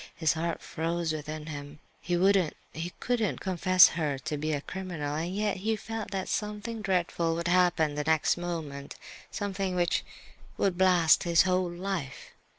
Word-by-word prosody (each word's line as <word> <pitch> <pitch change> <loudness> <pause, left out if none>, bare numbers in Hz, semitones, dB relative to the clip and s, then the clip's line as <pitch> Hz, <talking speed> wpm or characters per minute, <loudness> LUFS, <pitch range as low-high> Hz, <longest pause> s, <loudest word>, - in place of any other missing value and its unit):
His 160 -1 +2
heart 165 +1 -3
froze 165 0 -2
within 155 0 -5
him. 145 -1 -7 0.2
He 175 -1 0
wouldn't, 190 -3 +3 0.2
he 165 +3 -4
couldn't 235 -5 0
confess 185 -1 +5
her 150 -5 -1
to 135 +3 -4
be 155 +2 -2
a 145 - 0
criminal, 165 -5 -4
and 170 +4 -3
yet 210 -1 0
he 220 +4 0
felt 225 0 -5
that 190 -1 -3
something 210 +2 -3
dreadful 175 -4 0
would 170 +1 -2
happen 175 -4 +3
the 150 0 -2
next 160 0 +2
moment, 160 -5 -5 0.3
something 195 -2 -2
which 175 -1 +1 0.5
would 195 -3 +1
blast 180 -3 +5
his 170 -1 +4
whole 185 -1 +1
life. 175 -5 -5
175 Hz, 160 wpm, -29 LUFS, 155-190 Hz, 0.5 s, confess